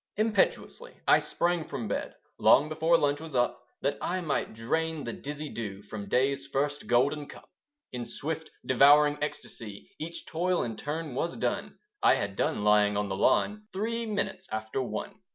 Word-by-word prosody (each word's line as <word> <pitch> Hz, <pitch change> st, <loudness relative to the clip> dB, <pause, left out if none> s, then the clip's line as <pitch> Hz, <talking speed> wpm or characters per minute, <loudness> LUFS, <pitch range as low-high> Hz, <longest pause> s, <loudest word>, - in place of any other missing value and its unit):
Impetuously 220 Hz, -, 0 dB
I -, -, +7 dB
sprang 175 Hz, -1 st, 0 dB
from 115 Hz, -, -4 dB
bed, 100 Hz, -, -3 dB, 0.2 s
Long 145 Hz, +3 st, +6 dB
before 160 Hz, +2 st, +3 dB
lunch 145 Hz, 0 st, +1 dB
was 160 Hz, -4 st, -8 dB
up, 120 Hz, 0 st, +1 dB, 0.2 s
That 140 Hz, +2 st, 0 dB
I 185 Hz, +1 st, -1 dB
might 155 Hz, -9 st, -2 dB
drain 160 Hz, +7 st, -1 dB
the 115 Hz, -, -4 dB
dizzy 150 Hz, +2 st, -6 dB
dew 105 Hz, -6 st, -6 dB
From 100 Hz, -1 st, -7 dB
day's 135 Hz, +3 st, +1 dB
first 145 Hz, +2 st, -1 dB
golden 140 Hz, +5 st, +2 dB
cup. -, -, -13 dB, 0.4 s
In 125 Hz, -1 st, -4 dB
swift 155 Hz, +6 st, -4 dB, 0.2 s
devouring 145 Hz, +3 st, +6 dB
ecstacy 110 Hz, -8 st, -6 dB
Each 165 Hz, +2 st, -6 dB
toil 180 Hz, +2 st, 0 dB
in 115 Hz, -2 st, -4 dB
turn 150 Hz, -1 st, -4 dB
was 170 Hz, +6 st, -2 dB
done; -, -, -2 dB, 0.2 s
I -, -, +6 dB
had 100 Hz, -1 st, -3 dB
done 105 Hz, -, 0 dB
lying 105 Hz, -1 st, +4 dB
on 105 Hz, -1 st, -1 dB
the 95 Hz, -, -2 dB
lawn 210 Hz, -, +2 dB
Three 230 Hz, +4 st, -2 dB
minutes 195 Hz, -3 st, -2 dB
after 110 Hz, +4 st, -2 dB
one. 125 Hz, -, -5 dB
145 Hz, 170 wpm, -29 LUFS, 120-165 Hz, 0.4 s, I